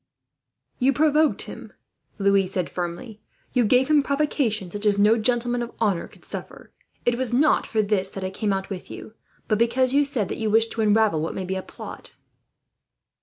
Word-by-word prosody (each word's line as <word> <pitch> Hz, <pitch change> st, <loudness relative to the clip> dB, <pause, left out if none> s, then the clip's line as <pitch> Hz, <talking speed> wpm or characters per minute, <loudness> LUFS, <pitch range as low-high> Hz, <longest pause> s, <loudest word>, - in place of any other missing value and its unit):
"You 270 Hz, +2 st, +3 dB
provoked 310 Hz, +1 st, +2 dB
him," -, -, -10 dB, 0.4 s
Louis 200 Hz, -2 st, +3 dB
said 185 Hz, -2 st, -3 dB
firmly. 180 Hz, +5 st, -5 dB, 0.3 s
"You 250 Hz, -, +3 dB
gave 250 Hz, +4 st, +3 dB
him 305 Hz, -1 st, +4 dB
provocation 275 Hz, -9 st, -1 dB
such 205 Hz, +2 st, -3 dB
as 205 Hz, -1 st, +3 dB
no 210 Hz, +2 st, +5 dB
gentleman 240 Hz, +1 st, 0 dB
of 235 Hz, 0 st, -5 dB
honour 200 Hz, -6 st, 0 dB
could -, -, -17 dB
suffer. -, -, -8 dB, 0.3 s
It 240 Hz, 0 st, +1 dB
was 255 Hz, -2 st, +1 dB
not 300 Hz, +4 st, +3 dB
for 220 Hz, -1 st, +1 dB
this 200 Hz, -2 st, 0 dB
that 195 Hz, -, -7 dB
I 185 Hz, -, -3 dB
came 205 Hz, +1 st, -2 dB
out 195 Hz, +1 st, -3 dB
with 185 Hz, -2 st, -6 dB
you, 215 Hz, -, -9 dB, 0.3 s
but 215 Hz, -, +1 dB
because 255 Hz, +2 st, +2 dB
you 290 Hz, +1 st, +4 dB
said 265 Hz, -8 st, -1 dB
that -, -, -5 dB
you 220 Hz, -1 st, -1 dB
wished 225 Hz, +1 st, +4 dB
to 225 Hz, -, -2 dB
unravel 210 Hz, -6 st, +3 dB
what 160 Hz, -, -3 dB
may 190 Hz, -, -4 dB
be 185 Hz, -, -3 dB
a 190 Hz, -, -3 dB
plot." -, -, -10 dB
220 Hz, 195 wpm, -24 LUFS, 195-250 Hz, 0.4 s, no